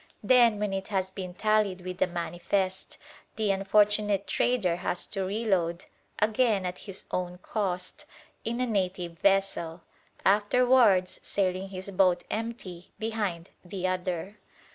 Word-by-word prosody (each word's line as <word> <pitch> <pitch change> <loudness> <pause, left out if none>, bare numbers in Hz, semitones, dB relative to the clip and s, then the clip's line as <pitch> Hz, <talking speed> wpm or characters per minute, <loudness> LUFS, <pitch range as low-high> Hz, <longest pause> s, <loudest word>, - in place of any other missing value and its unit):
Then, 235 -1 +5
when 205 -1 -1
it 195 0 -3
has 190 -2 -1
been 185 -2 -6
tallied 215 -3 +1
with 180 0 -6
the - - +3
"manifest," 185 +2 -2 0.4
the 215 -2 +1
unfortunate 205 +1 +2
trader 200 -9 +1
has 175 - -1
to 195 -2 -3
reload, 190 -4 0 0.3
again 215 -2 +2
at 180 0 -4
his 190 - -8
own 180 0 -2
cost, 185 -4 -3 0.4
in 235 +2 -2
a 255 - +2
native 180 -6 -2
vessel: 195 -4 +1 0.4
afterwards 205 -2 +4
sailing 190 -1 -1
his 190 +1 -6
boat 185 -2 +3
empty 215 -6 -5
behind 205 -6 -3
the 185 +1 -5
other. 185 +2 -2
195 Hz, 130 wpm, -28 LUFS, 180-210 Hz, 0.4 s, Then